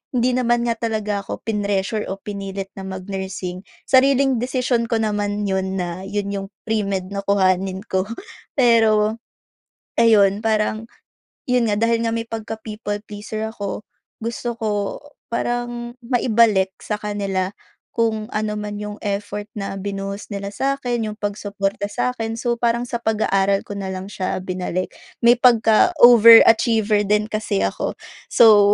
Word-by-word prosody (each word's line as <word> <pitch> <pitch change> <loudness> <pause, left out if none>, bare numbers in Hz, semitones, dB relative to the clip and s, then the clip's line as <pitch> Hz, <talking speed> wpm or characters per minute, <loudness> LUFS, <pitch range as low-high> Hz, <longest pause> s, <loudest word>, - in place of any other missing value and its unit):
hindi 250 +1 +2
naman 240 -1 +2
nga 235 - +1
talaga 215 -3 -2
ako 200 - -7
pinressure 205 0 -1
o 195 - -4
pinilit 195 -1 -6
na 195 - -8
mag-nursing. 190 -1 -5 0.2
Sariling 270 -1 +4
desisyon 250 -2 0
ko - - +1
naman 210 -1 -1
'yon 190 -1 -1
na 175 0 -3
'yon 200 0 -2
'yong 195 -1 -4 0.2
pre-med 200 -4 -1
na 200 - -2
kuhanin 190 -1 +1
ko. 190 -1 -1 0.5
Pero 225 -3 +4 0.8
ayun, 205 -3 +5
parang 220 +1 0 0.6
yun 250 -4 +2
nga, 205 - +1
dahil 230 +1 +2
nga - - 0
may 230 0 -2
pagka 225 -1 -5
people 210 -1 -4
pleaser 215 +1 -5
ako 205 -1 -5 0.4
gusto 235 +1 -3
ko 225 - -3 0.6
parang 240 0 -3
maibalik 230 -5 +3
sa 210 - -2
kanila 195 -3 -2 0.4
kung 225 -2 0
ano 210 0 -1
man 210 0 -5
yung 210 0 -6
effort 205 0 -3
na 195 -1 -5
binuhos 195 +1 -5
nila 200 0 -4
sa'kin, 245 -1 -1
yung 215 - -4
pagsuporta 205 -1 -3
sa'kin. 225 +2 -2
So, 240 -1 0
parang 235 +1 0
sa 235 - -1
pag-aaral 200 -3 +1
ko 205 - -8
nalang 190 0 -5
siya 185 -2 -3
binalik. 185 0 -3 0.3
May 235 +1 +6
pagka 235 - +4
over 230 -1 +10
achiever 220 -2 +2
din 210 +2 +1
kasi 215 - -1
ako. 95 0 -1 0.4
So, 205 -3 +7
210 Hz, 140 wpm, -21 LUFS, 200-230 Hz, 0.8 s, over